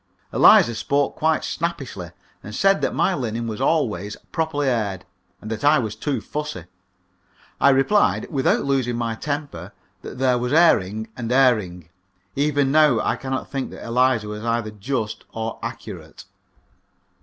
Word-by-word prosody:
Eliza 120 - +6
spoke 140 +5 0
quite 160 0 +1
snappishly, 135 - -4 0.3
and 105 +1 -8
said 195 +5 +3
that - - -1
my 195 - +2
linen 115 -6 -3
was 110 +1 -5
always 105 - 0 0.2
properly 160 -4 -1
aired, 105 -7 -1 0.3
and 110 - -8
that 110 -1 -4
I 150 +2 +5
was 110 -5 -2
too 140 +6 -2
fussy. 150 - -5 0.9
I - - +5
replied, 140 +10 +3
without 135 -2 +1
losing 130 -3 0
my 115 -1 -2
temper, 140 - -5 0.3
that - - -9
there 125 -1 +2
was 125 +2 -2
airing 110 - +3
and 120 -1 -4
airing. 105 -11 +2 0.5
Even 145 -1 +1
now 150 -6 +5
I - - 0
cannot 130 -1 -5
think 135 -2 -3
that - - -10
Eliza 120 -2 +2
was 105 +1 -6
either 115 -2 -1
just 110 +1 -4
or 115 0 -4
accurate. - - -8
125 Hz, 150 wpm, -22 LUFS, 110-145 Hz, 0.9 s, Eliza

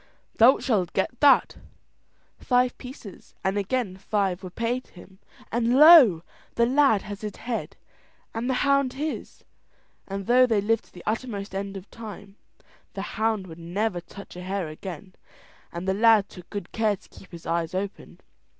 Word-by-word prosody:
"Thou 240 +4 +7
shalt 195 -9 -1
get 215 +5 -1
that," 285 -2 +5
said - - -16
O'Donnell. - - -21 0.7
Five 250 0 +2
pieces, 250 -6 -11
and 190 +1 0
again 205 -1 -2
five 195 -2 -1
were 185 - -7
paid 235 +6 -3
him, 190 +1 -16 0.3
and 235 +2 +1
lo! 280 - +8 0.3
the 235 - +3
lad 260 -4 +3
had 205 -1 -8
his 210 -2 -5
head 235 -1 -5 0.6
and 230 +3 -3
the 260 - +1
hound 275 -1 +2
his. 300 +3 -5 0.6
And 195 0 -5
though 250 +3 +5
they 225 -4 +2
lived 220 +2 0
to - - -24
the 175 - -12
uttermost 215 -3 -3
end 195 0 -4
of 195 +1 -11
time, 200 -3 -10 0.6
the - - -4
hound 220 -3 0
would 165 -2 -11
never 180 +2 -2
touch 195 +3 -12
a 180 - -7
hare 185 -2 -3
again, 185 +4 -9 0.6
and 170 +2 -6
the 190 - +2
lad 215 -1 +4
took 180 - -13
good 205 -1 -6
care 220 -2 +1
to - - -22
keep 190 - -16
his 170 -2 -11
eyes 170 +1 -2
open. 195 +1 -6
205 Hz, 175 wpm, -25 LUFS, 190-240 Hz, 0.7 s, lo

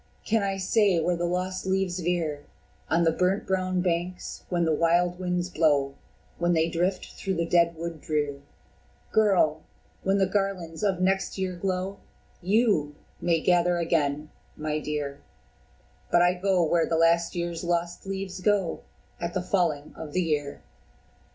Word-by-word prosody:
Can 225 0 +2
I 195 -1 -1
say 195 -1 +3
where 175 +2 +1
the 170 +1 -1
lost 185 +2 -2
leaves 190 -1 0
veer 160 -4 -1 0.4
On 170 +1 +3
the 165 - +4
brown 185 +4 +1
burnt 185 -1 0
banks, 180 0 -2
when 175 -2 +1
the 160 - +2
wild 175 +3 +2
winds 180 -1 -1
blow, 145 -5 +2 0.5
When 175 +1 +2
they 165 0 +2
drift 180 +3 -1
through 190 -1 -3
the 170 0 0
dead 170 0 +3
wood 165 -1 -6
drear? 145 -2 -2 0.7
Girl! 190 -7 +3 0.4
when 195 +1 +1
the 195 - +3
garlands 190 -4 -2
of 195 -4 +1
next 190 +2 +1
year 185 -1 -2
glow, 185 +2 -2 0.4
YOU 190 -7 +2 0.3
may 165 -2 +2
gather 175 0 +3
again, 150 -3 0 0.3
my 155 0 -2
dear 145 -2 -4 0.9
But 175 - +5
I 175 0 +4
go 185 -1 +1
where 165 +1 +2
the 165 - +1
last 170 +1 +3
year's 170 -1 -3
lost 175 0 -1
leaves 190 -1 -4
go 200 -4 +1 0.4
At 170 +1 -4
the 185 - 0
falling 165 -6 0
of 155 -2 -8
the 185 - +2
year." 145 -3 -2
175 Hz, 155 wpm, -27 LUFS, 165-185 Hz, 0.9 s, But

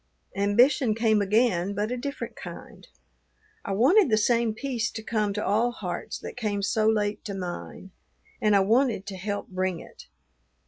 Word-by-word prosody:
Ambition 220 +4 +3
came 220 -2 +2
again, 200 -2 +1
but 210 +3 -1
a - - 0
different 280 +3 -5
kind: - - -10 0.8
I 195 - -3
wanted 290 - +4
the 215 - +3
same 230 0 +2
peace 240 -3 -2
to 220 - -7
come 215 -2 0
to 210 - -2
all 225 +4 +2
hearts 185 -7 -5
that - - -8
came 210 -4 -2
so 215 +2 +1
late 210 -1 0
to 200 - -4
mine, 185 +1 -7 0.5
and 210 -1 +4
I 200 - +5
wanted 225 0 +2
to 200 - -6
help 205 +2 -4
bring 185 -2 -2
it. - - -14
215 Hz, 170 wpm, -26 LUFS, 200-235 Hz, 0.8 s, I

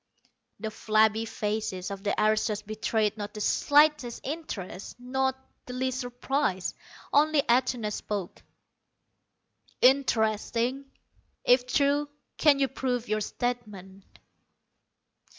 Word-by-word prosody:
The 220 +1 -4
flabby 220 +1 +2
faces 210 -3 -3
of 195 0 -6
the 205 - 0
aristos 215 -1 +1
betrayed 215 0 -1
not 205 0 -6
the - - -5
slightest 290 +2 +3
interest, 245 - -6
not 265 +1 -1 0.3
the 250 - -6
least 260 0 -1
surprise. 245 -5 -1 0.4
Only 300 0 +4
Atuna 240 -4 +1
spoke: 200 -4 -5 1.4
"Interesting, 240 0 +2 0.6
if 250 0 +4
true. 285 +2 +2 0.3
Can 295 -3 +5
you 275 -1 +2
prove 250 -3 -2
your 215 0 0
statement?" 205 -5 -4
235 Hz, 100 wpm, -28 LUFS, 210-265 Hz, 1.4 s, Can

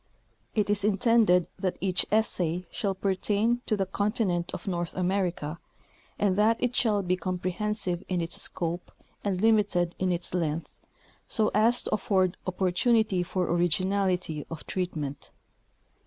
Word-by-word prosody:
It 210 -3 +2
is 205 -1 0
intended 210 -3 +4
that 185 -2 -1
each 185 -1 +1
essay 180 -5 +1
shall 195 -2 -1
pertain 205 +5 +1
to 215 - +1
the 195 - +1
continent 190 -3 -1
of 180 - -7
North 175 -2 -2
America, 180 -4 -1 0.6
and 200 -3 +2
that 225 +2 +4
it 250 0 0
shall 210 -4 +2
be 180 0 +1
comprehensive 185 +1 -2
in 180 -2 0
its 165 0 -2
scope 170 +1 -3 0.3
and 195 -3 -1
limited 205 -5 +3
in 185 -1 +1
its 175 0 -3
length, 165 -2 -2 0.5
so 215 -1 +2
as 230 +4 +4
to - - -3
afford 190 -4 +1
opportunity 190 +2 +2
for 180 +1 -1
originality 180 -1 +1
of 165 -2 -7
treatment. 155 -6 -4
185 Hz, 140 wpm, -28 LUFS, 175-210 Hz, 0.6 s, intended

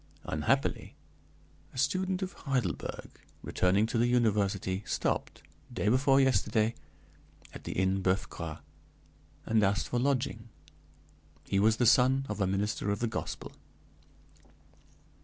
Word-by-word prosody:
Unhappily, - - -1 0.8
a - - -9
student 185 +8 0
of 185 - -5
Heidelberg, 130 - -3 0.2
returning 95 +4 +2
to 115 +1 -1
the 120 - +3
university, 100 -5 +1
stopped, - - -2 0.3
day 115 -3 0
before 135 +3 +4
yesterday, 120 -4 +2 0.8
at - - -11
the - - -4
Inn 95 +1 +1
Boeuf 95 +1 +1
Gras, 80 -2 -7 0.8
and 110 -1 +2
asked 100 +1 +1
for 120 - 0
lodging. 125 -4 -1 0.9
He 100 - 0
was 110 +2 +4
the 120 - +2
son 130 +3 +4
of 105 -1 -3
a 95 - +2
minister 100 +2 -1
of 100 - 0
the 120 - 0
gospel. 110 - -5
110 Hz, 125 wpm, -30 LUFS, 100-130 Hz, 0.9 s, before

